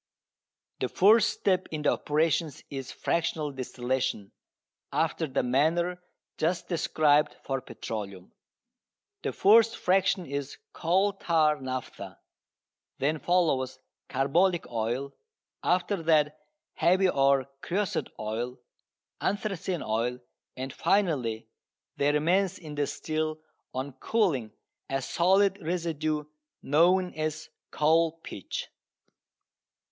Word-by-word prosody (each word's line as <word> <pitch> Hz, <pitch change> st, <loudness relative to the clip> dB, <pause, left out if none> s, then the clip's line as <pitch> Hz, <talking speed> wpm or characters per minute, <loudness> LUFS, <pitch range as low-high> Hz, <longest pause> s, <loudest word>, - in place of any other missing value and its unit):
The -, -, -1 dB
first 220 Hz, +3 st, +5 dB
step 185 Hz, -2 st, 0 dB
in 155 Hz, -1 st, -4 dB
the -, -, +4 dB
operations 155 Hz, 0 st, 0 dB
is 135 Hz, -2 st, -5 dB
fractional 160 Hz, -3 st, -1 dB
distillation, 130 Hz, -4 st, -2 dB, 0.6 s
after 160 Hz, -, 0 dB
the 135 Hz, -, 0 dB
manner 170 Hz, +8 st, +1 dB, 0.4 s
just 165 Hz, +2 st, 0 dB
described 155 Hz, -3 st, +2 dB
for 135 Hz, -1 st, -2 dB
petroleum. 100 Hz, -7 st, -7 dB, 0.9 s
The -, -, -2 dB
first 225 Hz, +3 st, +5 dB
"fraction" 185 Hz, 0 st, +2 dB
is 140 Hz, -1 st, -5 dB, 0.2 s
"coal 190 Hz, +5 st, +2 dB
tar 155 Hz, -6 st, +2 dB
naphtha." 125 Hz, -8 st, -6 dB, 0.8 s
Then 150 Hz, +3 st, 0 dB
follows 155 Hz, -8 st, +1 dB, 0.3 s
"carbolic 165 Hz, +7 st, +2 dB
oil," 120 Hz, +5 st, -2 dB, 0.5 s
after 180 Hz, +1 st, +1 dB
that 155 Hz, -2 st, +3 dB, 0.4 s
"heavy" 185 Hz, +4 st, +3 dB
or 135 Hz, -4 st, +3 dB, 0.2 s
"creosote 195 Hz, +1 st, -1 dB
oil," 115 Hz, +4 st, -3 dB, 0.6 s
anthracene 190 Hz, -3 st, -2 dB
oil, 115 Hz, +3 st, 0 dB, 0.4 s
and 130 Hz, +1 st, -5 dB
finally 140 Hz, -, 0 dB, 0.5 s
there 145 Hz, +1 st, +2 dB
remains 180 Hz, +5 st, +2 dB
in 155 Hz, -4 st, -9 dB
the 145 Hz, -1 st, 0 dB
still 155 Hz, +2 st, -3 dB, 0.3 s
on 130 Hz, +2 st, -4 dB
cooling 160 Hz, -, +1 dB, 0.4 s
a 135 Hz, -, 0 dB
solid 190 Hz, +7 st, +2 dB
residue 155 Hz, -3 st, -1 dB, 0.4 s
known 180 Hz, +5 st, +3 dB
as 155 Hz, 0 st, -3 dB, 0.2 s
coal 160 Hz, +1 st, +3 dB
pitch. 95 Hz, -, -6 dB
155 Hz, 100 wpm, -28 LUFS, 135-180 Hz, 0.9 s, first